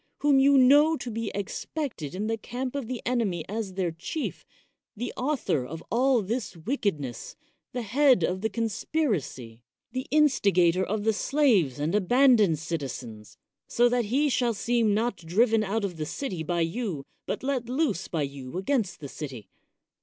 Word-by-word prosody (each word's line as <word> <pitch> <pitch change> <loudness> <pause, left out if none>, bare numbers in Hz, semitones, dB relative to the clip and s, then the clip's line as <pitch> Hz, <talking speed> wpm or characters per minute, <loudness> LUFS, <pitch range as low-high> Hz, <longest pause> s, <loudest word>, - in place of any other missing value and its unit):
whom 290 -2 +4
you 275 +1 +5
know 290 +5 +6
to 245 - -6
be 225 -1 -3
ex 200 -1 -4
pected 220 - -3
in 205 +3 -2
the 225 +1 0
camp 250 +3 -5
of 275 -5 -3
the 250 -1 -5
enemy 215 -10 0
as 210 -1 -4
their 185 -3 0
chief, 170 - -5 0.5
the 245 +3 -4
author 255 - 0
of 160 +6 -8
all 250 -1 +3
this 220 -2 -3
wickedness, 160 - -3 0.4
the 245 -1 -3
head 255 - +4
of 185 +3 0
the 220 - 0
conspiracy, 200 - -2 0.3
the 255 +2 -4
instigator 200 - +3
of 205 +2 -2
the 220 +1 +2
slaves 215 - +2
and 150 +4 -1
abandoned 215 - +4
citizens, 135 -9 -6 0.3
so 240 +1 +3
that 245 -1 +1
he 270 +8 +2
shall 240 -4 +1
seem 230 -1 +1
not 225 -1 0
driven 215 +7 +2
out 210 +1 -1
of 180 -4 -5
the 155 - -3
city 190 - -4
by 170 +2 -1
you, 165 - -2 0.2
but - - -3
let 260 -3 -1
loose 255 - 0
by 160 -4 -1
you 135 +1 -6
against 195 - -1
the 140 - -5
city? 130 -9 -8
215 Hz, 170 wpm, -27 LUFS, 170-250 Hz, 0.5 s, know